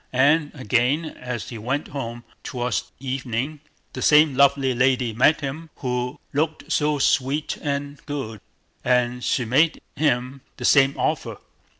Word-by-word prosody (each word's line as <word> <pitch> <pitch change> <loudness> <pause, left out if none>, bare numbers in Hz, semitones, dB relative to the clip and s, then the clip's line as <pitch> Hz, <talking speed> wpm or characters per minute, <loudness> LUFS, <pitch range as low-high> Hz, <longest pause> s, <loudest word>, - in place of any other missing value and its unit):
And 145 +4 +4
again 125 +5 +1
as 125 -6 -6
he 115 - -7
went 130 +7 -2
home, 120 -4 -5 0.2
towards 125 0 -2
evening 130 +2 -3 0.3
the - - -5
same 150 -1 +5
lovely 135 -1 +3
lady 125 -1 +2
met 140 +8 +4
him, 150 +4 -5
who 125 -1 -3
looked 155 +1 -1
so 150 -2 +2
sweet 140 +2 +1
and 145 -1 -3
good, 130 -8 -5 0.4
and 125 0 +1
she 125 - 0
made 150 +8 +3 0.2
him 130 -2 0 0.2
the 125 - -4
same 135 0 +5
offer. - - -1
135 Hz, 135 wpm, -23 LUFS, 125-145 Hz, 0.4 s, same